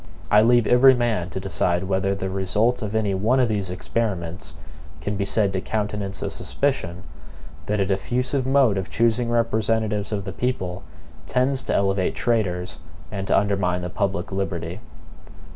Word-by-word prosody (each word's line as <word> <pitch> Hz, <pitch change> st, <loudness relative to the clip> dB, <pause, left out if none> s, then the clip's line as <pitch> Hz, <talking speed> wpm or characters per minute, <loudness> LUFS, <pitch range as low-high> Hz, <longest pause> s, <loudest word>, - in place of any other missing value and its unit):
I 105 Hz, -, +7 dB
leave 120 Hz, 0 st, +4 dB
every 130 Hz, +3 st, +6 dB
man 115 Hz, -7 st, 0 dB
to 95 Hz, -, -4 dB
decide 90 Hz, -1 st, 0 dB
whether 95 Hz, +1 st, 0 dB
the 95 Hz, -1 st, -4 dB
result 105 Hz, +6 st, +1 dB
of 105 Hz, -1 st, -3 dB
any 105 Hz, -3 st, +1 dB
one 110 Hz, +7 st, +2 dB
of 125 Hz, -, +4 dB
these 100 Hz, -4 st, -1 dB
experiments 90 Hz, -, -3 dB, 0.4 s
can 105 Hz, -, -3 dB
be 100 Hz, 0 st, -1 dB
said 100 Hz, -1 st, +1 dB
to 95 Hz, -, -1 dB
countenance 105 Hz, -2 st, -3 dB
a -, -, -2 dB
suspicion, 90 Hz, -11 st, -2 dB, 0.6 s
that 105 Hz, 0 st, 0 dB
a 100 Hz, -, +2 dB
diffusive 125 Hz, +7 st, -1 dB
mode 130 Hz, -7 st, +4 dB
of 95 Hz, -, -5 dB
choosing 115 Hz, +1 st, +1 dB
representatives 110 Hz, -3 st, 0 dB
of 100 Hz, -2 st, -2 dB
the -, -, -5 dB
people 95 Hz, -8 st, -2 dB, 0.5 s
tends 130 Hz, +1 st, +1 dB
to -, -, 0 dB
elevate 95 Hz, -1 st, +1 dB
traitors 95 Hz, -7 st, -1 dB, 0.3 s
and 95 Hz, -1 st, -4 dB
to -, -, +3 dB
undermine 95 Hz, -3 st, +1 dB
the 90 Hz, -, -4 dB
public 95 Hz, -3 st, -2 dB
liberty. 95 Hz, -2 st, -3 dB
100 Hz, 160 wpm, -23 LUFS, 95-115 Hz, 0.6 s, I